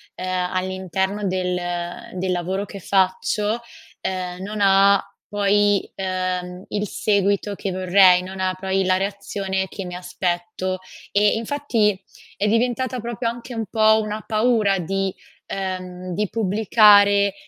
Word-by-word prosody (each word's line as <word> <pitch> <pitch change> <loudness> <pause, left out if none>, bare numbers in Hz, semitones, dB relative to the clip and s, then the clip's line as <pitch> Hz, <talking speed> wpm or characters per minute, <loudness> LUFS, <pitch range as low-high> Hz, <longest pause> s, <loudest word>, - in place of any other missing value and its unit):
ehm, 185 -1 -2
all'interno 190 +2 -2
del 180 -1 -1
uhm, 175 +5 -5
del 185 +1 -1
lavoro 185 +2 -1
che 200 0 -9
faccio, 200 +4 +1 0.4
ehm, 180 -1 -4
non 210 +2 -5
ha 195 0 +5 0.3
poi, 205 0 +2
ehm, 185 -1 -3
il 210 0 -2
seguito 200 0 0
che 195 0 -4
vorrei, 185 0 +5
non 190 +1 -8
ha 185 0 0
poi 190 0 0
la 185 0 +2
reazione 195 -1 -2
che 195 0 -7
mi 180 - -7
aspetto, 180 +1 -3 0.3
e 205 +1 +3
infatti, 225 -5 0 0.3
è 210 - 0
diventata 245 +3 0
proprio 235 +1 -3
anche 240 +2 -8
un 225 -1 -3
po' 220 -1 +4
una 215 0 -4
paura 215 -3 +2
di 195 +2 -2 0.3
ehm, 185 -1 -5
di 210 +2 0
pubblicare, 205 -1 +5
195 Hz, 135 wpm, -22 LUFS, 185-210 Hz, 0.4 s, ha